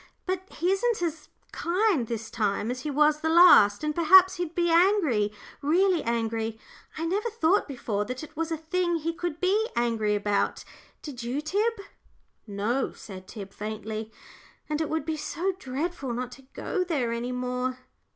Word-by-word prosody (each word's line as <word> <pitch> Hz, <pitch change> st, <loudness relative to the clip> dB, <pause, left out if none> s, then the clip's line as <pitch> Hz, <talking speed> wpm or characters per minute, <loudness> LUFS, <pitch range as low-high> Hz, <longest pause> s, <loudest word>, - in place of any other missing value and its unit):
But 375 Hz, 0 st, -3 dB
he 350 Hz, +3 st, 0 dB
isn't 420 Hz, 0 st, +1 dB
as 320 Hz, -2 st, -4 dB, 0.2 s
kind 345 Hz, -, +1 dB
this 225 Hz, -1 st, -5 dB
time 210 Hz, 0 st, -1 dB
as 250 Hz, -, -4 dB
he 300 Hz, -, -4 dB
was 300 Hz, +1 st, +3 dB
the 320 Hz, -, 0 dB
last, 320 Hz, -, +7 dB
and 305 Hz, 0 st, 0 dB
perhaps 365 Hz, +4 st, +6 dB
he'd 350 Hz, -2 st, -4 dB
be 345 Hz, -1 st, +2 dB
angry, 330 Hz, -, +3 dB, 0.3 s
really 350 Hz, +4 st, +3 dB
angry. 225 Hz, -1 st, -2 dB, 0.4 s
I 325 Hz, -, -2 dB
never 405 Hz, +7 st, 0 dB
thought 405 Hz, -3 st, +2 dB
before 225 Hz, -6 st, -2 dB
that 250 Hz, +6 st, -5 dB
it 310 Hz, 0 st, -11 dB
was 330 Hz, +1 st, -2 dB
a 325 Hz, -, -1 dB
thing 345 Hz, +2 st, -1 dB
he 330 Hz, +1 st, -2 dB
could 340 Hz, -1 st, -4 dB
be 415 Hz, +5 st, +1 dB
angry 225 Hz, -3 st, +1 dB
about, 205 Hz, 0 st, 0 dB, 0.4 s
did 270 Hz, -5 st, -7 dB
you, 245 Hz, +4 st, -2 dB
Tib?" 405 Hz, +10 st, 0 dB, 0.7 s
"No," 215 Hz, +6 st, -1 dB
said 185 Hz, -2 st, -11 dB
Tib, 200 Hz, -4 st, -9 dB
faintly; 215 Hz, +1 st, -5 dB, 0.6 s
"and 300 Hz, +1 st, -1 dB
it 315 Hz, -, -2 dB
would 315 Hz, -2 st, -2 dB
be 315 Hz, -1 st, -2 dB
so 355 Hz, +5 st, -2 dB
dreadful 275 Hz, -1 st, -3 dB
not 250 Hz, 0 st, -4 dB
to 265 Hz, +1 st, -14 dB
go 380 Hz, -4 st, -1 dB
there 285 Hz, -10 st, -1 dB
any 235 Hz, +2 st, -3 dB
more." 250 Hz, 0 st, -2 dB
300 Hz, 170 wpm, -27 LUFS, 235-350 Hz, 0.7 s, last